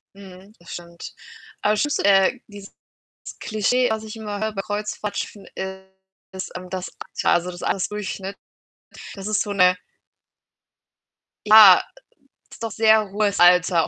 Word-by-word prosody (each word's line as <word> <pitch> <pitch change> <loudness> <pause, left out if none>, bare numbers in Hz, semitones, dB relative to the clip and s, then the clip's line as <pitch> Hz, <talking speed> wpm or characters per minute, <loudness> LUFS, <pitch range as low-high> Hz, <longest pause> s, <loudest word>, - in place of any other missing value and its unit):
Mhm, 195 +1 -14
das 170 - -16
stimmt. 170 0 -10 0.5
Aber 210 - +2
das 210 - 0
schlimmste 295 -8 -1
äh, 195 +5 +4
dieses 205 -2 -12 0.7
Klischee, 245 +3 0
was 220 0 -3
ich 220 0 -9
immer 210 -2 -6
höre 220 0 -2
bei 195 - -3
Kreuzfahrtschiffen, 210 0 -5 0.9
ist, 190 0 -7
ähm, 180 0 -11
das 185 -1 -5 0.3
Alter, - - +2
also, 175 +1 +1
das 175 - -10
Altersdurchschnitt. 195 0 -3 0.8
Das 195 +1 -7
ist 215 -2 0
so 205 - -3
'ne 180 -2 +3 1.7
Ja, 210 -4 +9 0.7
es - - -13
doch 225 -2 -4
sehr 220 -2 +3
hohes 205 0 0
Alter 175 -1 +4
200 Hz, 140 wpm, -22 LUFS, 185-215 Hz, 1.7 s, Ja